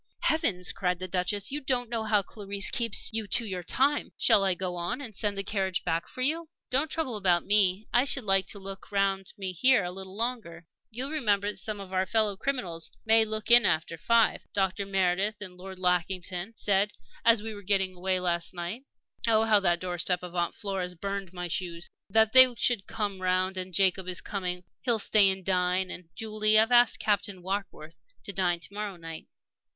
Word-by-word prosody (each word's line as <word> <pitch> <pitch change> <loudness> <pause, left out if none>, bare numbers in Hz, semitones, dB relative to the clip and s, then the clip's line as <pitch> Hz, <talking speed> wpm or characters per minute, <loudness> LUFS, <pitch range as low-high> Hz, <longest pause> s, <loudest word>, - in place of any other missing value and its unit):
"Heavens!" 225 - +2
cried 180 -2 -1
the 185 +1 -5
Duchess. 190 +3 -1
"You 295 +2 -3
don't 250 -3 -1
know 230 -1 -2
how 210 -2 +2
Clarisse 200 0 -5
keeps 230 -2 +3
you 220 -1 -2
to 235 +3 +2
your 185 -4 -4
time. 275 - 0
Shall 220 -4 +5
I 190 -2 +2
go 180 0 -4
on, 175 +8 -3
and 230 -7 -8
send 205 -1 -1
the 195 - -2
carriage 195 -2 -2
back 165 -1 -2
for 255 - -4
you?" 320 +4 0 0.2
"Don't 280 +5 +1
trouble 300 -7 -3
about 180 -4 +2
me. 200 0 +2
I 245 +2 +5
should 275 -2 0
like 195 -2 +3
to - - -5
look 195 0 -9
round 195 -1 0
me 190 -2 -4
here 250 +3 +4
a 180 - -4
little 190 +1 -10
longer." 220 -8 -4 0.2
"You'll 255 +5 -2
remember 205 -9 0
that - - -13
some 210 +1 -5
of 190 -1 -9
our 185 0 0
fellow 215 -3 +1
criminals 190 -9 -4 0.2
may 225 0 +5
look 215 +1 -3
in 240 0 +9
after 165 +1 0
five? 230 +7 +2
Dr. 195 0 -1
Meredith 195 +2 0
and 185 -3 -9
Lord 190 +1 -10
Lackington 180 +2 -1
said, 200 -1 +2 0.3
as 230 -2 +4
we 220 0 -5
were 205 - -10
getting 190 -1 +1
away 185 +1 -1
last 175 0 -1
night 180 +10 -6 0.4
oh, 220 -1 +5
how 220 -2 +4
that 175 -3 +1
doorstep 180 0 -2
of 180 -1 -8
Aunt 175 -1 -1
Flora's 190 -3 -4
burned 195 +1 -5
my 180 -1 -5
shoes! 170 0 -4 0.2
that 220 +2 +3
they 260 -1 +9
should 230 -4 0
come 200 -3 -3
round. 185 +1 0
And 185 0 -5
Jacob 190 0 +1
is 180 -1 -2
coming; 180 -3 -4 0.2
he'll 240 -3 +2
stay 205 -1 +4
and 190 -1 -3
dine. 185 0 +1
And, 180 -2 -9
Julie, 215 -1 +2
I've 220 +2 +4
asked 245 0 +5
Captain 200 -3 -1
Warkworth 185 -4 -5 0.2
to 200 - -5
dine 175 -3 +1
to 195 - -7
morrow 205 -1 -5
night." 165 -2 -9
195 Hz, 200 wpm, -28 LUFS, 180-220 Hz, 0.4 s, in